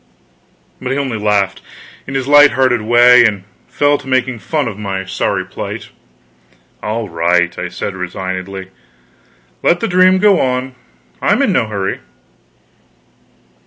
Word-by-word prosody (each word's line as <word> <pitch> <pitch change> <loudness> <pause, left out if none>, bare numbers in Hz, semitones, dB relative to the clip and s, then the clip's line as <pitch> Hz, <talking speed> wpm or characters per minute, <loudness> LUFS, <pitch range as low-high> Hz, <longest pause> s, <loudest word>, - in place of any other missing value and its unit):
But 125 - -3
he 135 - -1
only 130 -6 -2
laughed, 105 -2 0 0.5
in 135 - -6
his 135 -1 -2
light 145 0 +6
hearted 130 -3 +2
way, 120 +2 +6
and 105 -5 0 0.2
fell 145 0 +1
to - - -13
making 130 -2 0
fun 150 +2 -2
of 105 -2 -6
my 95 -2 -4
sorry 95 - -2
plight. - - -7 0.9
"All 110 +1 -3
right," 85 +1 +1
I - - -3
said 100 - -5
resignedly, 95 +1 -5 0.9
"let 175 - +2
the 230 - -1
dream 185 0 +4
go 200 -1 +4
on; 130 0 -1 0.5
I'm - - +2
in - - +2
no 110 - +1
hurry." 100 -3 -3
120 Hz, 140 wpm, -15 LUFS, 95-135 Hz, 0.9 s, light